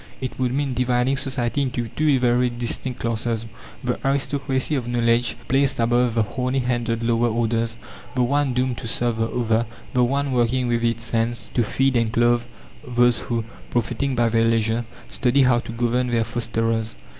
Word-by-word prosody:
It 130 0 -5
would 125 -1 +1
mean 135 0 -1
dividing 125 +2 +1
society 135 -1 -1
into 125 -3 -2
two 150 +1 +2
very 125 0 +3
distinct 120 +1 -3
classes 115 0 -1 0.4
the 125 -1 -1
aristocracy 135 0 0
of 130 -5 -1
knowledge 120 0 +1
placed 135 0 +1
above 120 0 +2
the 115 - +3
horny 125 +4 -2
handed 120 -2 -1
lower 115 0 +2
orders 115 0 0 0.4
the 125 - +2
one 140 0 +1
doomed 125 -1 0
to - - -6
serve 120 0 0
the 115 0 +1
other; 115 -1 0 0.3
the 125 - +3
one 140 +3 0
working 125 +1 +1
with 120 -1 0
its 115 0 -1
hands 115 +1 0
to 120 - +2
feed 135 +3 +1
and 115 -2 +2
clothe 120 +1 +3 0.4
those 120 -1 +2
who, 115 -2 -2 0.2
profiting 125 +3 -1
by 120 -1 +3
their 115 0 +2
leisure, 115 0 +1 0.3
study 130 +2 +2
how 125 -2 +4
to 115 - -7
govern 120 +2 0
their 120 -2 +1
fosterers. 115 -1 -1
120 Hz, 175 wpm, -23 LUFS, 115-130 Hz, 0.4 s, how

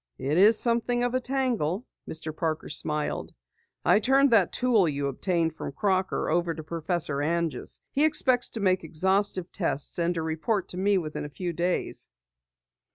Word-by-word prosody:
"It 145 +6 0
is 215 +3 +6
something 240 +1 +1
of 245 0 0
a 255 - +2
tangle," 245 - -1 0.2
Mr. 155 -1 -4
Parker 160 -1 -2
smiled. 150 0 -1 0.5
"I - - +5
turned 270 +4 +4
that 205 -7 +4
tool 230 -9 +3
you 140 -1 -2
obtained 165 +3 -1
from 140 - -6
Crocker 190 +4 0
over 170 0 0
to 160 - -7
Professor 165 -2 -1
Anjus. 165 +1 -2
He 285 - +1
expects 260 -5 +3
to 225 - -6
make 185 -2 +2
exhaustive 190 +3 0
tests 165 -4 -2
and 170 +1 +1
to 165 - -2
report 160 +6 -1
to 180 - -5
me 200 +1 +2
within 155 -4 -4
a 150 - -6
few 175 +3 -4
days." 175 +2 -1
180 Hz, 165 wpm, -27 LUFS, 160-220 Hz, 0.5 s, is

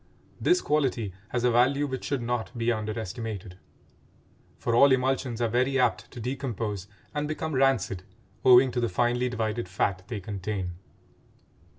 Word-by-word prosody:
This 360 +1 +3
quality 130 -9 0 0.2
has 120 -1 -1
a 125 - +4
value 135 +5 +3
which 130 -2 -4
should 140 -4 -1
not 120 0 -3
be 115 +1 +1
underestimated; 110 -3 -4 1.0
for 120 - -1
all 140 +4 +7
emulsions 130 -2 +1
are - - +3
very 130 +4 +1
apt 125 -2 +1
to - - -10
decompose 115 -6 -3 0.3
and 150 0 -1
become 155 +1 -3
rancid 130 -8 +2 0.4
owing 125 +1 +7
to 125 - -1
the 120 - +1
finely 120 +5 +1
divided 110 -3 -2
fat 95 0 0
they 110 -2 -4
contain. 95 -1 -4
120 Hz, 150 wpm, -27 LUFS, 110-130 Hz, 1.0 s, all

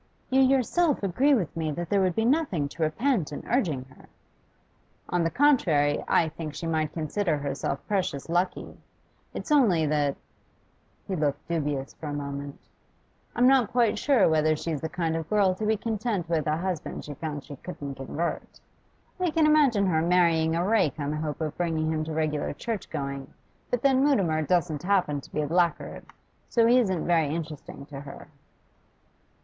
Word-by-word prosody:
'You 265 +1 +5
yourself 270 +3 +2
agree 265 +10 +3
with 185 -10 -2
me 160 -1 -2
that 175 +2 -4
there 200 -1 +3
would 185 -2 +1
be 225 - +1
nothing 245 - +1
to 165 - -10
repent 180 - 0
in 145 - -7
urging 170 - 0
her.' 130 - -19 1.0
'On 175 -1 +1
the 165 - +1
contrary, 170 - +3
I 165 - +3
think 155 -1 -7
she - - -5
might 160 -2 0
consider 160 +1 -1
herself 140 -1 -3
precious 185 -9 -1
lucky. 175 +2 -2 0.6
It's - - -5
only 210 - +4
that' 145 -2 +1 0.9
he 190 - -2
looked 145 -3 -1
dubious 145 -5 -2
for 155 - -8
a 145 - -3
moment 140 0 -5 0.8
'I'm 245 - +3
not 260 -4 +4
quite 235 -4 +2
sure 265 -7 +4
whether 155 -1 +3
she's 155 -1 -3
the 160 - -3
kind 165 -1 -1
of 160 -1 -4
girl 200 -3 +3
to 210 +3 -3
be 220 0 +2
content 215 -4 -2
with 160 -3 0
a 155 +1 +1
husband 180 -2 -4
she 150 - -6
found 145 -2 -5
she 145 - -10
couldn't 145 -3 -7
convert. 145 +6 -4 0.6
I 365 -1 +1
can 315 0 +2
imagine 285 -10 +4
her 160 -4 +2
marrying 165 -2 +3
a 170 +1 0
rake 205 -10 +2
on 145 0 -2
the 150 - -2
hope 155 0 -4
of 155 -1 -2
bringing 160 -2 0
him 155 -1 -1
to 160 - -5
regular 155 -2 -1
churchgoing, 140 - -5 0.4
but 245 - -1
then 270 -1 +4
Mutimer 190 - +2
doesn't 160 -1 0
happen 180 -7 +1
to - - -16
be 150 - -1
a 150 - -2
blackguard, 170 +2 0 0.4
so 230 -1 +3
he 245 +2 +5
isn't 190 -8 0
very 165 -3 +3
interesting 150 -2 -6
to 140 -1 -9
her. 140 0 -10
165 Hz, 180 wpm, -27 LUFS, 150-210 Hz, 1.0 s, You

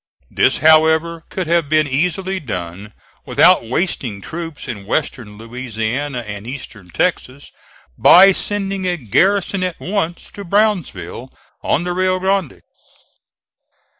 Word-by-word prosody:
This, - - +2
however, 160 +1 +4
could 185 - -3
have 165 -2 +1
been 155 -1 +3
easily 180 +7 -1
done 100 - -6 0.4
without 115 - +4
wasting 130 - -2
troops 165 +6 -7
in 100 -3 -7
western 115 -7 -3
Louisiana 120 +3 -4
and 105 -1 -8
eastern 115 -8 -9
Texas, 140 - -2 0.5
by 195 +2 +8
sending 195 -1 -2
a 175 -1 0
garrison 185 - +1
at 180 -2 -3
once 180 -3 -3
to 200 - -9
Brownsville 170 - -1 0.3
on 160 - 0
the 180 0 -2
Rio 185 +1 +1
Grande. 190 -5 -1
160 Hz, 120 wpm, -18 LUFS, 120-185 Hz, 0.5 s, by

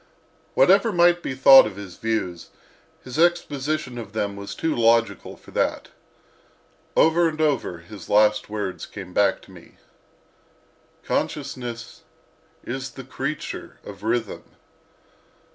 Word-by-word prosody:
Whatever - - +5
might 175 -1 +4
be 130 - -4
thought 135 0 +8
of - - -8
his 100 -3 -10
views, 110 -6 -3 0.5
his 130 +4 -6
exposition 155 -6 0
of 105 -3 -9
them 100 -2 -2
was 100 0 -7
too 160 -1 -1
logical 115 -4 +1
for - - -17
that. - - -1 1.1
Over 165 +1 +4
and 155 0 -8
over, 145 - 0
his 90 +2 -12
last 105 0 +3
words 105 -3 -4
came 95 -3 -10
back 100 0 +2
to - - -17
me: - - -16 1.3
"Consciousness 120 -2 -4 0.6
is 130 +2 -5
the 135 - -10
creature 130 +3 -5
of 100 -1 -11
Rhythm." 115 -1 -2
120 Hz, 125 wpm, -23 LUFS, 105-150 Hz, 1.3 s, thought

